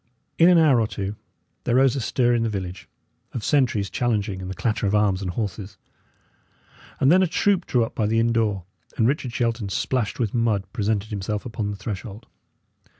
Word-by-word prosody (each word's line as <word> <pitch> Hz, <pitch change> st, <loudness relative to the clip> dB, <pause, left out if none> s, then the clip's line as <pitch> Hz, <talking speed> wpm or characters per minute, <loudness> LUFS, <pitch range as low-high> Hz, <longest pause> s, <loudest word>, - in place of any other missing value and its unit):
In 170 Hz, +2 st, +7 dB
an 180 Hz, -, +6 dB
hour 145 Hz, -7 st, +5 dB
or 110 Hz, -, +1 dB
two, 100 Hz, -1 st, -4 dB, 0.5 s
there 120 Hz, -, +1 dB
rose 135 Hz, 0 st, +4 dB
a 135 Hz, -, -2 dB
stir 120 Hz, +1 st, +1 dB
in 120 Hz, -, +1 dB
the 115 Hz, -, 0 dB
village 95 Hz, -3 st, -6 dB, 0.4 s
of 120 Hz, -, -4 dB
sentries 120 Hz, -9 st, +2 dB
challenging 105 Hz, -2 st, -1 dB
and 90 Hz, -, -6 dB
the 95 Hz, -, -5 dB
clatter 110 Hz, -1 st, -1 dB
of 100 Hz, -, +1 dB
arms 100 Hz, -2 st, +2 dB
and 95 Hz, -, -3 dB
horses; 100 Hz, 0 st, -4 dB, 1.2 s
and 135 Hz, -, +4 dB
then 185 Hz, +2 st, +6 dB
a 185 Hz, -, +3 dB
troop 190 Hz, +2 st, +1 dB
drew 120 Hz, -3 st, +2 dB
up -, -, -10 dB
by 105 Hz, -, 0 dB
the 115 Hz, +1 st, +2 dB
inn 115 Hz, 0 st, +2 dB
door, 105 Hz, -5 st, 0 dB, 0.3 s
and 115 Hz, -, +3 dB
Richard 135 Hz, -2 st, -1 dB
Shelton, 115 Hz, -3 st, -1 dB
splashed 115 Hz, +2 st, -1 dB
with 115 Hz, -5 st, -1 dB
mud, 115 Hz, -5 st, +1 dB
presented 110 Hz, -2 st, -1 dB
himself 105 Hz, +2 st, -3 dB
upon 110 Hz, -3 st, -3 dB
the 100 Hz, -, -5 dB
threshold. 105 Hz, +1 st, -6 dB
110 Hz, 200 wpm, -23 LUFS, 100-120 Hz, 1.2 s, In